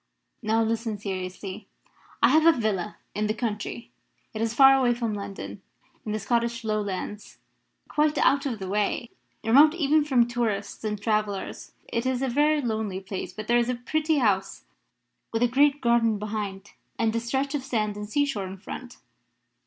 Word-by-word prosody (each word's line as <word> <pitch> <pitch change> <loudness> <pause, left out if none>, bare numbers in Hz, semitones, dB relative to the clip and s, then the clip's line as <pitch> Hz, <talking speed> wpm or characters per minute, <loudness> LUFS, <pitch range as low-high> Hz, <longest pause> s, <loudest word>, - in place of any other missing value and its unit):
Now 225 0 +2
listen 225 -1 -1
seriously. 190 0 -5 0.6
I - - +7
have 315 +1 +5
a 325 -6 +5
villa 210 -2 -1 0.2
in 210 +1 -1
the 215 - -1
country. 225 +1 -4 0.4
It 215 - -4
is 225 0 +1
far 270 +1 +8
away 255 -3 +3
from 230 -2 -2
London, 200 -1 -6 0.4
in 215 - -4
the 215 - 0
Scottish 235 +2 -1
Lowlands 210 -1 -3 0.5
quite 300 0 +1
out 280 +1 +3
of 240 -4 -3
the 190 -2 -6
way 210 +4 -1 0.3
remote 285 +8 +6
even 305 -2 +3
from 255 -5 +3
tourists 225 -5 -2
and 210 -1 -2
travellers. 210 -2 -2
It 235 +2 -2
is 260 0 0
a - - +1
very 295 +4 +3
lonely 220 -6 -2
place, 190 -1 -6
but 215 +4 -7
there 240 0 +4
is 240 0 0
a 250 - 0
pretty 310 +6 0
house, 195 -6 +1 0.7
with 225 +1 +1
a - - +5
great 285 +4 +3
garden 235 -3 +3
behind 205 -2 -5 0.3
and 225 0 +1
a - - +2
stretch 265 +5 -1
of 295 - -1
sand 215 -6 -1
and 210 0 -6
seashore 250 -7 0
in 190 +1 -8
front. 245 +5 -8
225 Hz, 175 wpm, -26 LUFS, 210-255 Hz, 0.7 s, far